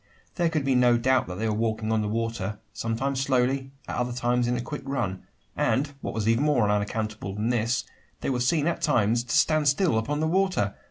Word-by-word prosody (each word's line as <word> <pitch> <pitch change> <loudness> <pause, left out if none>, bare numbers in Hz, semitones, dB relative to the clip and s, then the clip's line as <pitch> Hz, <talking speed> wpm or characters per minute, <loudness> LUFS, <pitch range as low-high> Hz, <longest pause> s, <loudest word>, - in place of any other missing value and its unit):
There 170 -2 +1
could 155 -4 -1
be 135 - +2
no 125 -1 +4
doubt 130 +2 +2
that 90 0 -6
they 110 +3 -1
were 110 - 0
walking 110 0 -1
on 110 -1 +2
the 105 - -1
water 110 -2 -2 0.2
sometimes 130 +4 -2
slowly, 135 0 +1 0.2
at - - -4
other 125 0 -1
times 120 0 0
in 125 0 0
a - - -2
quick 145 +5 -5
run 115 -9 -2 0.3
and, 145 +2 +1
what - - -4
was 110 -1 -1
even 115 +4 +3
more 140 -8 +3
unaccountable 105 -1 -2
than 105 +3 -1
this, 120 +1 0 0.4
they - - -1
were 125 - -1
seen 145 +5 +2
at 170 - -1
times 120 -4 +2
to 120 - 0
stand 155 -2 +3
still 145 - +3
upon 145 +6 -2
the 160 - +1
water! 180 - +1
120 Hz, 220 wpm, -26 LUFS, 110-140 Hz, 0.4 s, no